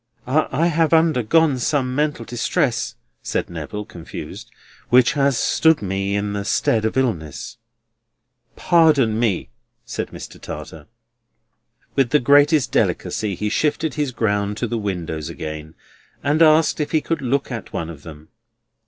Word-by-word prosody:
"I 155 +4 +1
have 165 -1 +2
undergone 160 -2 +3
some 130 0 0
mental 145 -4 -1
distress," 120 -1 -1 0.3
said - - -3
Neville, 85 +6 -6
confused, 90 -7 -9 0.4
"which 125 +3 +5
has 140 -3 +2
stood 160 +5 +3
me 95 +1 -1
in 100 0 -1
the 100 0 -3
stead 110 +1 +1
of 110 - -1
illness." 110 - -2 1.0
"Pardon 150 -10 +3
me," 105 - 0 0.4
said - - -4
Mr. - - -11
Tartar. 80 -2 -8 1.1
With 135 -3 +2
the 150 - +4
greatest 145 0 +4
delicacy 105 -3 0
he 105 +4 -2
shifted 150 +4 0
his 145 -3 -1
ground 105 -3 -1
to 120 - -1
the 115 0 -2
windows 85 -6 -4
again, 80 0 -7 0.5
and 150 +3 +1
asked 155 0 +5
if 150 - -2
he 155 - +3
could 165 -1 -2
look 135 +1 -1
at 115 -4 -6
one 85 0 -4
of 75 -4 -12
them. 80 0 -12
120 Hz, 145 wpm, -21 LUFS, 100-150 Hz, 1.1 s, which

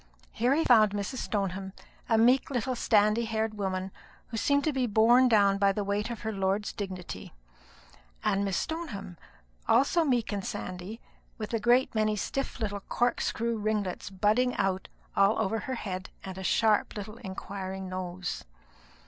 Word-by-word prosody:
Here 245 +5 +2
he 325 - +2
found 215 -4 +5
Mrs. 205 +5 -3
Stoneham, 195 -2 -2 0.4
a 225 - +4
meek 245 +4 +4
little 255 -1 -1
sandy 215 0 +3
haired 220 -1 -1
woman, 190 -2 -3 0.4
who 225 - -4
seemed 285 +6 +2
to 310 - +1
be 260 -2 +1
borne 235 +4 +5
down 200 -3 +4
by 200 0 +4
the 205 +1 -2
weight 205 +3 -1
of 235 -2 -6
her 220 - -2
lord's 195 +1 -1
dignity; 185 - -6 0.9
and 195 +1 +1
Miss 195 -3 0
Stoneham, 250 - -4 0.5
also 275 +8 +4
meek 245 -7 +1
and 200 -1 -2
sandy, 185 +6 -5 0.4
with 215 +1 -5
a 230 - +1
great 245 +4 +3
many 215 -1 +1
stiff 270 +6 -3
little 205 -3 -2
corkscrew 235 +1 -1
ringlets 210 -4 -2
budding 215 +6 +2
out 190 -1 0 0.3
all 200 +2 +4
over 220 +1 0
her 260 +5 -4
head 185 -4 -5
and 190 -1 -6
a - - -6
sharp 215 +2 +2
little 210 +2 -7
inquiring 190 -1 -6
nose. 185 -1 -4
210 Hz, 160 wpm, -29 LUFS, 195-235 Hz, 0.9 s, found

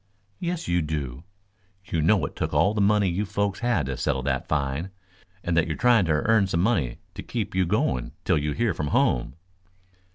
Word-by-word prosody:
"Yes 175 -1 -3
you 85 0 +2
do. 75 -2 -4 0.6
You 85 - -1
know 90 0 +3
it - - -7
took - - -2
all 100 - +4
the 105 - 0
money 100 0 +3
you 90 +3 0
folks 100 -1 -1
had 115 - +1
to 65 0 -3
settle 65 0 -1
that 65 -1 -1
fine, 75 +4 -1 0.5
and 85 - 0
that 85 0 +3
you 80 - -1
are - - -8
trying 120 -6 +4
to 80 - +1
earn 100 +6 +3
some 85 -2 0
money 80 - +1 0.2
to - - -7
keep 115 -4 -4
you 95 -1 +1
going 65 -6 0
till - - +3
you 75 0 -1
hear 115 0 0
from 75 -2 -3
home." 60 -2 +1
85 Hz, 205 wpm, -25 LUFS, 75-105 Hz, 0.6 s, all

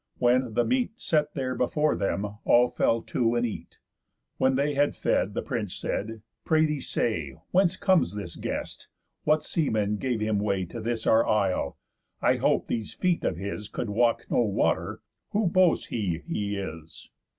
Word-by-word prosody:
When, 125 -2 +2
the 120 - +3
meat 250 -2 0
Set 150 -2 0
there 130 -3 -1
before 150 +5 +1
them, 100 +1 -1 0.2
all 120 +1 +5
fell 115 0 +1
to, 120 -1 0
and 120 0 +1
eat. 115 - -6 0.6
When 130 0 +3
they 145 +2 +1
had 145 +1 +2
fed, - - 0
the - - -1
prince - - -3
said: 110 +1 -4 0.2
"Pray 155 0 +3
thee 150 -3 -2
say, 80 - -1 0.2
Whence 185 -1 +3
comes 185 - +2
this 105 - -6
guest? - - -5 0.4
What 155 0 +3
seaman 110 -9 0
gave 125 0 -1
him 110 -1 0
way 100 -3 0
To 115 +7 -7
this 115 0 -2
our 110 +1 +4
isle? 100 -3 +1 0.4
I - - +3
hope - - +2
these 110 -3 -3
feet 180 -2 +1
of - - -1
his 100 +3 -5
Could 115 - -4
walk 115 +2 +2
no - - +3
water. 110 -5 0 0.3
Who 210 +1 +2
boasts 180 -1 +3
he 90 -8 -2
he 100 -1 -2
is?" 80 -4 -8
120 Hz, 175 wpm, -27 LUFS, 105-150 Hz, 0.6 s, all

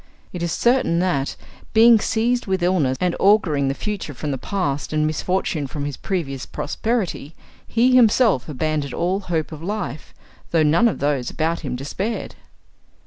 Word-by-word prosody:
It 180 - -5
is 170 -1 -1
certain 240 -7 +2
that, 170 -6 0 0.4
being 230 0 +7
seized 235 +3 0
with 190 -2 0
illness, 160 -8 +2
and 180 -1 0
auguring 185 -9 +3
the 135 - -1
future 200 -8 -4
from 145 +3 -4
the 135 - -2
past 145 -8 -2
and 155 0 +2
misfortune 155 -1 -1
from 145 +1 -5
his 145 -2 -4
previous 140 -8 -4
prosperity, 185 - -3 0.3
he 245 +3 +3
himself 225 - +4
abandoned 150 -1 -2
all 185 +3 0
hope 170 -5 -2
of 155 -1 -8
life, 180 -5 -5 0.3
though 165 -2 +3
none 165 +10 +4
of 225 - -2
those 140 -3 0
about 165 +2 -1
him 130 -6 -4
despaired. 185 - -4
170 Hz, 160 wpm, -21 LUFS, 145-205 Hz, 0.4 s, being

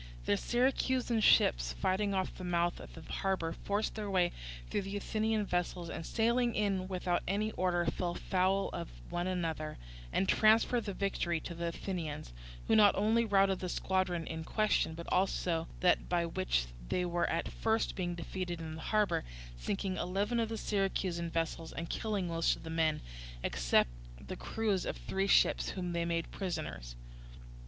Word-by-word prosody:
The 100 - +3
Syracusan 250 - +1
ships - - +4
fighting 190 - 0
off 190 -1 -1
the 185 - -9
mouth 175 -1 +1
of - - -11
the 165 - -10
harbour 185 0 -1
forced 205 +4 -1
their 210 -2 -4
way 180 -2 +3 0.4
through - - -1
the 195 +1 -4
Athenian 215 +1 0
vessels 175 -2 -2
and - - -5
sailing 235 +1 +2
in 195 -3 0
without 180 -2 0
any 210 +3 0
order 180 -3 +1
fell 175 +1 -1
foul 190 +1 +1
of - - -4 0.2
one 175 +1 -1
another, 165 -4 -2 0.3
and 190 - +1
transferred 225 +2 +4
the 200 -3 -4
victory 175 -4 0
to 170 - -6
the 170 0 -3
Athenians; 165 - -4 0.3
who - - +4
not 210 -2 +7
only 225 +3 +3
routed 195 -2 +3
the 185 - -3
squadron 185 -2 0
in 160 0 -4
question, 210 -4 +1
but 170 +1 -7
also 180 -3 +1
that 180 -1 +3
by 175 -1 +2
which 170 - 0 0.2
they 180 - +1
were 175 0 0
at 165 - 0
first 225 0 0
being 175 -2 -2
defeated 175 0 -4
in 160 -1 -5
the 160 - -7
harbour, 210 +3 +1 0.3
sinking 190 - -2
eleven 200 +6 0
of 225 -1 0
the 225 - -3
Syracusan 190 -5 -1
vessels 165 0 -2
and 170 0 -5
killing 205 -5 -1
most 165 -1 +2
of - - -13
the 160 - -6
men, 160 -1 +1 0.4
except - - +2 0.3
the - - -7
crews 210 -5 -1
of - - -3
three 195 +1 -1
ships - - +4
whom 180 -2 -3
they 170 0 0
made 170 -1 -1
prisoners. 155 - -4
185 Hz, 170 wpm, -33 LUFS, 170-205 Hz, 0.4 s, not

